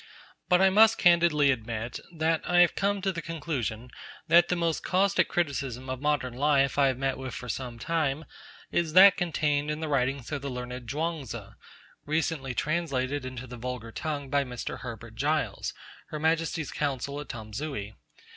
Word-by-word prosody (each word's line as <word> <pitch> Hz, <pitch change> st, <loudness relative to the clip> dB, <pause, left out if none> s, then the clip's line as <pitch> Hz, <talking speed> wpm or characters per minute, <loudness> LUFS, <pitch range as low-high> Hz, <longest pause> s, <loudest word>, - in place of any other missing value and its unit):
But 180 Hz, +1 st, +5 dB
I 190 Hz, 0 st, +6 dB
must 220 Hz, +3 st, +6 dB
candidly 170 Hz, -5 st, +5 dB
admit 115 Hz, -1 st, -4 dB
that 160 Hz, -1 st, 0 dB
I 175 Hz, 0 st, +6 dB
have 175 Hz, -, +5 dB
come 200 Hz, -1 st, 0 dB
to 195 Hz, -, +1 dB
the 170 Hz, -2 st, -5 dB
conclusion 130 Hz, -8 st, -4 dB, 0.4 s
that 170 Hz, +1 st, +6 dB
the 180 Hz, -, +1 dB
most 170 Hz, -2 st, 0 dB
caustic 195 Hz, +2 st, +2 dB
criticism 135 Hz, -6 st, -2 dB
of 130 Hz, 0 st, -5 dB
modern 145 Hz, -4 st, 0 dB
life 140 Hz, +1 st, +2 dB
I 140 Hz, -, +5 dB
have 130 Hz, -2 st, 0 dB
met 135 Hz, 0 st, -1 dB
with 130 Hz, -2 st, -6 dB
for 125 Hz, -, -7 dB
some 120 Hz, 0 st, -4 dB
time 155 Hz, +2 st, -1 dB, 0.5 s
is 165 Hz, -3 st, 0 dB
that 195 Hz, +2 st, +9 dB
contained 150 Hz, -5 st, 0 dB
in 150 Hz, 0 st, -2 dB
the 160 Hz, -, -3 dB
writings 135 Hz, -2 st, 0 dB
of 145 Hz, -2 st, -2 dB
the 140 Hz, -, -4 dB
learned 125 Hz, -1 st, -6 dB
Chuang 160 Hz, 0 st, -2 dB
Tzu, 110 Hz, -, -7 dB, 0.5 s
recently 150 Hz, -4 st, -1 dB
translated 145 Hz, -4 st, -1 dB
into 130 Hz, -1 st, -6 dB
the 125 Hz, -1 st, -9 dB
vulgar 125 Hz, -1 st, -5 dB
tongue 145 Hz, 0 st, -4 dB
by 140 Hz, 0 st, +3 dB
Mr. 125 Hz, -2 st, -6 dB
Herbert -, -, -8 dB
Giles, -, -, -1 dB, 0.4 s
Her 155 Hz, -, -5 dB
Majesty's 160 Hz, 0 st, 0 dB
Consul 140 Hz, 0 st, -2 dB
at 150 Hz, -, -8 dB
Tamsui. 110 Hz, 0 st, -5 dB
145 Hz, 175 wpm, -28 LUFS, 130-165 Hz, 0.5 s, that